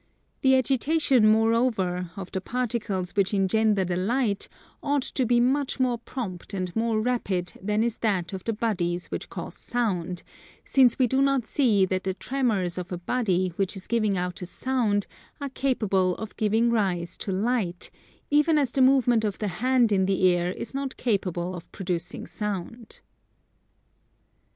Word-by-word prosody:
The 265 -1 +5
agitation, 270 -1 +3
moreover, 220 -6 +1
of 190 -2 -7
the 190 - -3
particles 220 -6 -2
which 200 0 +1
engender 200 0 +2
the 180 0 -1
light 210 +1 0 0.3
ought 285 -2 0
to 255 -2 -1
be 240 0 +4
much 270 +3 +1
more 250 -2 +1
prompt 200 -6 -6
and 185 -2 -3
more 225 -1 +1
rapid 200 -7 -1
than 210 +3 +1
is 235 -1 -1
that 195 -4 -1
of 190 - -5
the 230 - -1
bodies 180 -6 -2
which - - -4
cause - - -6
sound, 185 -7 -2 0.4
since 255 -4 +4
we 260 - +4
do 265 +3 +1
not 275 -3 +2
see 220 -9 +3
that 185 0 -2
the 190 -1 -2
tremors 205 -7 -1
of 180 0 -7
a 180 - -2
body 185 -1 0
which 195 0 0
is 190 - -9
giving 215 -4 +1
out 180 0 -3
a 180 - -5
sound 220 -3 0 0.3
are 280 -1 -4
capable 205 -9 +1
of 220 -1 -7
giving 225 +2 +2
rise 185 -6 0
to 195 - -3
Light, 195 -3 -1 0.4
even 300 +2 +4
as 275 -5 +1
the 270 - +1
movement 255 -4 +4
of 205 -3 -1
the 210 - -2
hand 250 -3 +3
in 190 -2 +2
the 190 -1 +3
air 175 0 -1
is 230 - -7
not 275 -1 -4
capable 185 -6 -1
of 175 -1 -9
producing 180 -2 -4
Sound. 210 +2 -6
215 Hz, 165 wpm, -26 LUFS, 185-250 Hz, 0.4 s, The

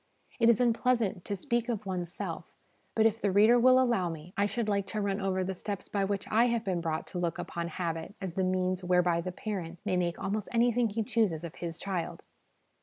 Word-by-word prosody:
It 230 -1 +5
is 230 - +5
unpleasant 235 -5 +1
to 205 - -2
speak 235 +3 -1
of 215 -3 -2
one's 180 -3 -3
self, - - -5 0.5
but 220 - +4
if 225 0 +2
the 205 - +2
reader 215 +5 +6
will 255 +1 +6
allow 235 -9 +2
me, 165 +2 -8
I 200 +1 +2
should 230 +1 -2
like 200 -2 0
to 215 - -3
run 200 0 -1
over 190 -1 0
the 190 +1 -2
steps 200 +2 -5
by 200 -1 0
which 200 0 -2
I 230 +3 +5
have 235 -2 0
been 180 -3 0
brought 160 -1 -2
to 180 - -2
look 170 -1 -1
upon 170 0 -4
habit 170 +1 -4
as 190 -4 -4
the 190 - 0
means 185 0 0
whereby 180 -1 +3
the 185 +2 -4
parent 180 -4 -5
may 185 -3 +1
make 175 -1 0
almost 210 +1 -3
anything 235 0 +3
he 220 +2 -1
chooses 215 -9 +1
of 170 -1 -6
his 170 -1 -6
child. 185 -4 -4
195 Hz, 225 wpm, -30 LUFS, 180-225 Hz, 0.5 s, reader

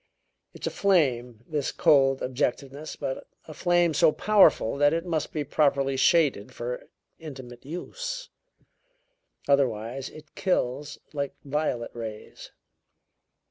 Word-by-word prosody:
It's - - -7
a - - -1
flame, 125 - +1
this 150 -3 -2
cold 135 -2 +4
objectiveness, 135 +3 -2
but 130 - -5 0.2
a 155 - -9
flame 175 0 +2
so 160 +1 +5
powerful 200 - +4
that 145 +1 +4
it 165 +1 -1
must 160 -4 -2
be 150 - -2
properly 140 -2 +1
shaded 135 -6 +3
for 125 +1 -5 0.3
intimate 130 -6 -10
use. - - -6 1.2
Otherwise 130 -2 +1
it 155 0 -14
kills 150 -6 -1 0.2
like 140 -1 -3
violet 140 -5 -1
rays. 110 -2 -8
140 Hz, 115 wpm, -27 LUFS, 125-160 Hz, 1.2 s, so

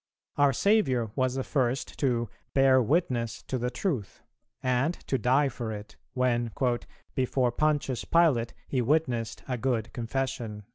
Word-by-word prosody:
Our 145 -1 +4
Saviour 130 - +2
was 130 -1 +1
the 135 - -1
first 130 -2 -1
to 120 -4 +1 0.3
"bear 135 -1 +6
witness 125 -4 0
to 130 - -3
the 125 +1 -1
Truth," 130 - -3 0.4
and 130 +6 +1
to 135 - 0
die 135 +4 +3
for 120 -3 -4
it, 105 -1 -8 0.2
when 120 -2 +1 0.6
"before 130 -1 +1
Pontius 145 -2 0
Pilate 150 -9 +3
he 130 - 0
witnessed 125 -4 0
a 125 -2 -2
good 120 -4 -1
confession." 120 -3 -3
130 Hz, 140 wpm, -28 LUFS, 120-135 Hz, 0.6 s, bear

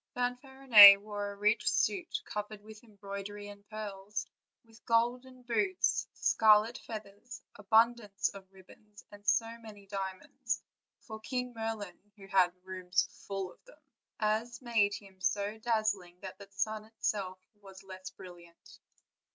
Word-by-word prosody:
Fanfarinet 245 -5 +8
wore 205 0 -5
a - - -9
rich 210 +3 +2
suit 365 -3 -1
covered 210 0 -6
with 215 +1 -13
embroidery 205 -1 -8
and 200 0 -12
pearls, 210 -2 -5 0.4
with 225 0 -20
golden 245 +2 0
boots, 355 +11 0
scarlet 220 +1 +4
feathers, 215 +2 -9
abundance 210 -1 +2
of 195 -1 -13
ribbons, 205 +2 -18
and 205 0 -15
so 230 0 +1
many 210 -3 -13
diamonds, 195 +5 -4 0.4
for 220 -1 -9
King 250 +2 -4
Merlin 220 -5 -5 0.3
had 185 -2 +5
whole 180 +1 -31
rooms 185 -1 -1 0.2
full 195 -2 -4
of - - -30
them, - - -18 0.4
as 220 +2 -1
made 220 -5 +1
him 195 -2 -13
so 205 +2 -1
dazzling 215 -6 -1
that 190 0 -9
the 200 - -11
sun 215 +2 -3
itself 205 -4 -3 0.2
was 195 -1 -13
less 185 -1 -9
brilliant. 175 -2 -15
210 Hz, 135 wpm, -31 LUFS, 195-225 Hz, 0.4 s, Fanfarinet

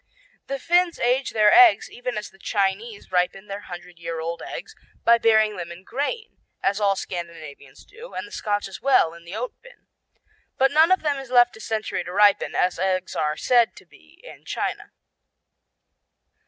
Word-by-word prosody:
The 275 - -3
Finns 350 +5 +2
age 255 +2 +1
their 210 -1 +4
eggs 360 -2 +7
even 245 -2 -5
as 210 - -6
the 195 - -22
Chinese 200 +2 -2
ripen 180 +2 0
their 200 0 -6
hundred 175 -1 -10
year 165 -1 -5
old 165 +1 -4
eggs, - - -8 0.3
by 235 0 +5
burying 220 -2 +3
them 170 -1 -6
in 170 +2 -11
grain, 290 - -4 0.2
as 200 +1 +1
all 200 -1 +3
Scandinavians 165 -7 -8
do, 460 +4 -13
and - - -4
the - - -17
Scotch 205 - -2
as 195 - -10
well, 255 -11 +3
in 170 0 -14
the 175 +4 -8
oat 245 +3 -4
bin. - - -18 0.7
But 270 +1 +3
none 315 +4 +5
of 375 - +3
them 290 -3 0
is 270 -2 -10
left 245 -1 +4
a 220 - -12
century 215 -5 -3
to 180 - -8
ripen, 205 +1 +3
as 180 -1 +1
eggs 185 -1 -1
are 155 -2 -1
said 240 -2 +3
to - - -15
be 80 - -22
in - - -13
China. - - -4
210 Hz, 185 wpm, -23 LUFS, 180-255 Hz, 0.7 s, eggs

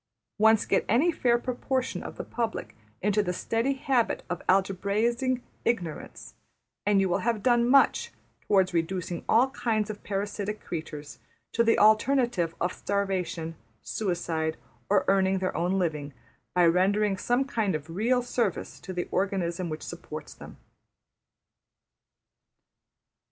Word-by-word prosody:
Once 220 0 +5
get - - +2
any 270 - +4
fair 240 -6 +2
proportion 255 +1 -2
of - - -8
the - - -4
public 230 -2 -4 0.3
into 210 +1 +3
the 180 - -1
steady 230 +8 0
habit 265 -3 0
of 175 - -3
algebraising 210 +7 +1 0.2
ignorance, 175 -10 -3 0.5
and 205 -1 +4
you 195 - +3
will 175 - +1
have 225 -3 -1
done 240 -1 +3
much 280 - +4 0.4
towards 190 -3 +3
reducing 170 0 -2
all 255 +4 +4
kinds 220 -5 -1
of 210 - -10
parasitic 205 +1 -3
creatures 150 -4 -7 0.3
to 230 - +2
the 230 0 +3
alternative 215 -5 +3
of 180 +1 0
starvation, 185 -5 -2 0.3
suicide, 165 -5 -2 0.3
or 205 - +3
earning 195 0 +3
their 185 0 -2
own 180 +3 +1
living 150 -6 -2 0.4
by 180 -1 +5
rendering 195 +4 +3
some 245 +7 +1
kind 220 - 0
of 155 0 -5
real 230 +9 +1
service 245 -1 -2
to 185 - -7
the 175 -1 -3
organism 185 -2 -1
which 155 0 -5
supports - - -8
them. - - -12
200 Hz, 135 wpm, -27 LUFS, 180-235 Hz, 0.5 s, Once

